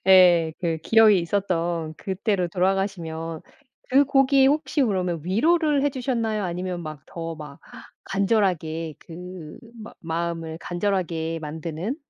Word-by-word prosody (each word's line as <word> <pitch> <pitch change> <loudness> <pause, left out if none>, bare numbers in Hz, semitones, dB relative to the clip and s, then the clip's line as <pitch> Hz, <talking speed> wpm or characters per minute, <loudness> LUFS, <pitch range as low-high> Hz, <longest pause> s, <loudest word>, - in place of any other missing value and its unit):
예 175 -4 +6
그 165 -2 0
기억이 220 -3 +6
있었던 170 -3 -1
그때로 190 0 -1
돌아가시면 175 -4 -2 0.5
그 275 +2 +6
곡이 270 0 +4
혹시 295 0 +1
그러면 180 -7 0
위로를 295 - +2
해 290 - +2
주셨나요? 230 -5 -1
아니면 180 0 -3
막 155 -3 -8
더 165 -1 -6
막 150 -2 -10 0.5
간절하게 180 -6 0
그 175 -2 -10 0.2
막 215 - -11
마음을 165 -1 -3
간절하게 175 -3 -2
만드는 160 - -4
180 Hz, 270 characters per minute, -24 LUFS, 165-215 Hz, 0.5 s, 예